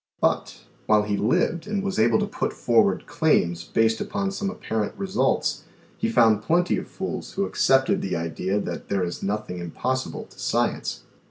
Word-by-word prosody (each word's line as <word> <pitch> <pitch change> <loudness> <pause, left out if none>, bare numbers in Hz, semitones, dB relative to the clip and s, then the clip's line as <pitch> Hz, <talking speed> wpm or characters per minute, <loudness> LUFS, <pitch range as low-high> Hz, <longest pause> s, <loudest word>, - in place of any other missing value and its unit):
But, - - 0 0.3
while 105 -1 +5
he 105 -1 -1
lived 160 - +1
and 205 -2 -1
was 195 -1 -2
able 110 0 +4
to - - +1
put - - -3
forward - - +2
claims 85 0 +1
based 115 +5 +1
upon 195 -1 -2
some 195 0 -2
apparent 110 - -3
results, 195 0 0 0.3
he 225 - -1
found 110 - +4
plenty 175 +7 +2
of - - -8
fools 190 - -5
who 195 - 0
accepted 135 -6 +2
the 95 - -2
idea 85 +4 -1
that - - -5
there 100 -2 +1
is 85 0 -4
nothing 100 -3 -3
impossible 130 +10 -3
to - - -17
science. - - -1
110 Hz, 170 wpm, -25 LUFS, -, 0.3 s, while